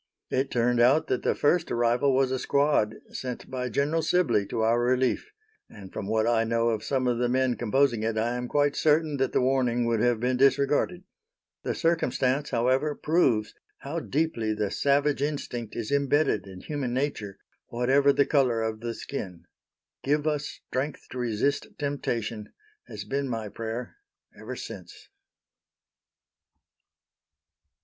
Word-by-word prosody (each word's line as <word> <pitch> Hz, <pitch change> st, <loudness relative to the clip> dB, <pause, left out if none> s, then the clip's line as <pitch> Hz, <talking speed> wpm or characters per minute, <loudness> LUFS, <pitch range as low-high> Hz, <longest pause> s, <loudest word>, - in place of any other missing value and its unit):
It 135 Hz, +1 st, 0 dB
turned 120 Hz, 0 st, +1 dB
out 135 Hz, +7 st, +5 dB
that 130 Hz, -, 0 dB
the -, -, +1 dB
first 165 Hz, +3 st, +2 dB
arrival 120 Hz, +3 st, +2 dB
was 130 Hz, -1 st, +2 dB
a 130 Hz, -, -1 dB
squad 140 Hz, -7 st, +2 dB, 0.2 s
sent 125 Hz, 0 st, -6 dB
by 125 Hz, -1 st, -3 dB
General 145 Hz, +7 st, 0 dB
Sibley 160 Hz, -, +2 dB
to 110 Hz, -, -2 dB
our 115 Hz, +2 st, +3 dB
relief, 130 Hz, -, +1 dB, 0.4 s
and 95 Hz, -3 st, -12 dB
from 100 Hz, -, -5 dB
what 110 Hz, +1 st, +1 dB
I 115 Hz, -1 st, +3 dB
know 115 Hz, +1 st, +1 dB
of 110 Hz, -2 st, -2 dB
some 130 Hz, -2 st, 0 dB
of 120 Hz, -1 st, +1 dB
the 120 Hz, 0 st, +1 dB
men 130 Hz, 0 st, +1 dB
composing 120 Hz, 0 st, +1 dB
it, 110 Hz, 0 st, -1 dB
I 115 Hz, +2 st, 0 dB
am 125 Hz, 0 st, -3 dB
quite 145 Hz, +2 st, +1 dB
certain 155 Hz, -1 st, +2 dB
that 135 Hz, -1 st, 0 dB
the -, -, +2 dB
warning 125 Hz, -2 st, +1 dB
would 115 Hz, -1 st, +1 dB
have 120 Hz, 0 st, +2 dB
been 125 Hz, +2 st, 0 dB
disregarded. 140 Hz, +6 st, +2 dB, 0.6 s
The -, -, -2 dB
circumstance, 145 Hz, -4 st, 0 dB
however, 130 Hz, +5 st, +1 dB
proves 130 Hz, -10 st, +1 dB, 0.3 s
how 150 Hz, +5 st, -4 dB
deeply 140 Hz, -9 st, -1 dB
the 105 Hz, -2 st, -2 dB
savage 140 Hz, 0 st, +1 dB
instinct 130 Hz, -6 st, -3 dB
is 115 Hz, 0 st, -4 dB
imbedded 140 Hz, -7 st, +1 dB
in 95 Hz, -1 st, -10 dB
human 135 Hz, -5 st, -3 dB
nature, 110 Hz, -8 st, -2 dB, 0.3 s
whatever 135 Hz, +4 st, +3 dB
the 140 Hz, 0 st, +3 dB
color 130 Hz, -6 st, +2 dB
of 110 Hz, -1 st, -2 dB
the 115 Hz, 0 st, -4 dB
skin. 95 Hz, -12 st, -6 dB, 0.6 s
"Give 150 Hz, +2 st, +1 dB
us 150 Hz, -2 st, 0 dB, 0.2 s
strength 140 Hz, +3 st, -4 dB
to 130 Hz, -, -5 dB
resist 120 Hz, +4 st, 0 dB
temptation," 115 Hz, -7 st, -3 dB, 0.4 s
has -, -, -7 dB
been 140 Hz, 0 st, -2 dB
my 110 Hz, -3 st, -3 dB
prayer 115 Hz, -, -6 dB, 0.4 s
ever -, -, -7 dB
since. -, -, -10 dB
125 Hz, 155 wpm, -27 LUFS, 115-140 Hz, 0.6 s, out